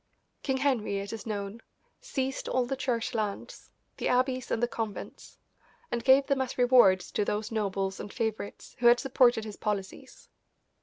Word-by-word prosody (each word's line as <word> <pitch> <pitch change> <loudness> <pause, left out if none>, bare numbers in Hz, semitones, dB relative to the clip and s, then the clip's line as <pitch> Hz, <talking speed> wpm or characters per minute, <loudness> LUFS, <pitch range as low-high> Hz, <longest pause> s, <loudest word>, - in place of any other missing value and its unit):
King 265 -2 0
Henry, 255 -7 0
it 200 +2 -5
is 225 0 -7
known, 205 +1 -4 0.4
seized 270 - -3
all 255 -1 +1
the 270 +2 -2
Church 250 -3 -2
lands, 215 -3 -4 0.3
the - - -2
abbeys 255 0 +1
and 230 - -1
the - - +4
convents, 225 -3 -6 0.5
and 235 -1 -2
gave 265 +2 +6
them 275 -1 +1
as 260 - -3
rewards 245 -7 +5
to 210 - 0
those 210 +2 -2
nobles 195 -3 -1
and 205 - -7
favourites 220 -3 -4
who 240 - +4
had 240 +1 +7
supported 245 -4 +3
his 210 -2 -8
policies. 200 -2 -5
235 Hz, 165 wpm, -29 LUFS, 210-255 Hz, 0.5 s, had